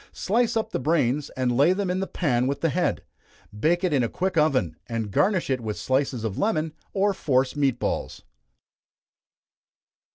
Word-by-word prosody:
Slice 230 +3 +1
up 220 - -2
the - - -1
brains, 145 -1 +1
and 125 -2 +1
lay 145 +8 +5
them 190 -1 -1
in 185 - -1
the 195 - -2
pan 125 -7 0
with 140 +1 -2
the 165 - +2
head. 175 +5 0 0.5
Bake 170 - +1
it 180 -4 +1
in 135 - +3
a 115 - 0
quick 185 0 -2
oven, 150 -5 +2
and 115 -3 -3
garnish 190 - +2
it 130 -2 0
with 110 -2 -4
slices 130 -3 -1
of 110 -4 -3
lemon, 160 -7 0 0.2
or 200 0 +1
force 135 -7 +1
meat 140 -4 +1
balls. - - -3
150 Hz, 180 wpm, -25 LUFS, 125-185 Hz, 0.5 s, lay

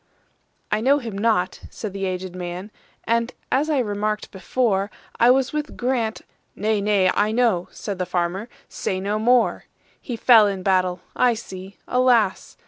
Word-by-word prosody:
"I 215 - +1
know 275 +4 +4
him 235 -7 -6
not," 200 -3 +1
said 215 -4 -6
the 195 0 -3
aged 185 -1 -4
man,"And, 205 +6 -4 0.2
as 285 +4 +2
I 300 - +2
remarked 210 -2 -2
before,I 205 +2 0
was 260 +1 +3
with 300 0 -4
Grant"—"Nay, 220 -3 -2
nay, 200 -3 +3
I 210 +1 +1
know,"Said 210 -4 -1
the 180 - -1
farmer, 180 +5 -2 0.2
"say 185 - -3
no 205 +3 -1
more:"He 245 +1 -1
fell 225 -2 +6
in 195 -2 -3
battle,—I 185 +5 +1
see, 190 -3 -9
alas! 245 -6 +2
210 Hz, 135 wpm, -23 LUFS, 190-240 Hz, 0.2 s, fell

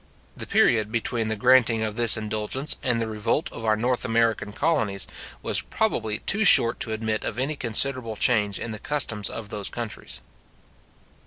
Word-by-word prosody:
The - - -7
period 110 -2 +2
between 115 0 -2
the 110 - -1
granting 120 -1 +3
of 105 -1 -3
this 120 -2 +5
indulgence 110 +6 -2
and 125 -3 0
the 115 - -1
revolt 110 +7 -2
of 115 - -9
our 110 -1 +2
North 120 +3 -1
American 115 -2 0
colonies, 110 -8 0 0.4
was - - 0
probably 110 -1 -2
too 215 +2 0
short 120 - +6
to 115 - -4
admit 110 0 -2
of - - -4
any 135 +4 -2
considerable 120 -1 0
change 105 -4 +1
in 115 - -5
the 110 - -7
customs 115 -7 -1
of 110 -3 -8
those 105 -2 -4
countries. 115 -3 -6
115 Hz, 170 wpm, -24 LUFS, 110-125 Hz, 0.4 s, short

